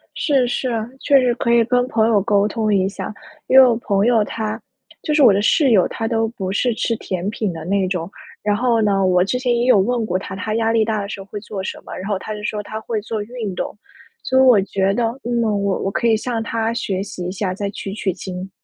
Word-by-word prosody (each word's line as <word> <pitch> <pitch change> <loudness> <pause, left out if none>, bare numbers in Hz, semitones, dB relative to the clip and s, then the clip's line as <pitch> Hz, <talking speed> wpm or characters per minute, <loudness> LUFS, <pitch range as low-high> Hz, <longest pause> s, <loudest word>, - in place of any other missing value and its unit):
是， 270 -5 +2
是， 255 +1 -2 0.3
确 275 -2 +4
实 245 -2 +2
可 235 - 0
以 235 -1 +5
跟 245 +1 +1
朋 225 -3 +2
友 215 -3 +3
沟 205 0 +2
通 215 -1 0
一 190 0 +2
下。 200 - -6 0.3
因 265 - +5
为 265 - +10
我 235 - +2
朋 205 -2 0
友 230 -3 +3
她 220 +1 -4 0.4
就 300 - -1
是 300 - +4
我 230 -6 +8
的 195 - +1
室 275 +4 +3
友， 195 -5 +5
她 225 -1 -3
都 225 -1 0
不 195 -5 -5
是 235 +3 +1
吃 230 0 -1
甜 185 -1 -4
品 210 -3 -2
的 165 -1 -7
那 190 +1 +1
种， 180 -1 -3 0.3
然 205 0 +1
后 235 -1 +2
呢， 195 -2 +2
我 180 -1 +3
之 250 +6 -1
前 250 -1 0
也 240 +1 +1
有 250 - +6
问 235 +4 +1
过 185 - 0
她， 190 - -7
她 215 +3 -3
压 225 0 +1
力 225 -1 +3
大 215 -1 -1
的 200 - -6
时 200 - -6
候 195 - -10
会 210 - -5
做 200 -2 -6
什 - - -5
么？ - - -8
然 190 +3 -6
后 200 -2 0
她 215 +2 -6
就 210 - -8
说 210 -1 -3
她 215 +1 -6
会 220 -1 -3
做 215 0 -4
运 220 -4 -5
动， - - -4 0.5
所 260 - +1
以 265 - +6
我 245 -6 +6
觉 195 0 0
得， 240 - 0 0.2
嗯， 240 -1 0
我 200 -3 0
我 195 - -1
可 235 +4 -1
以 225 -1 +4
向 230 0 -3
她 225 0 -1
学 190 -4 -2
习 185 -3 -7
一 180 - -3
下， 185 -2 -2
再 200 0 -3
取 195 -1 -6
取 195 -3 -2
经。 185 +1 -7
215 Hz, 280 characters per minute, -20 LUFS, 195-235 Hz, 0.5 s, 为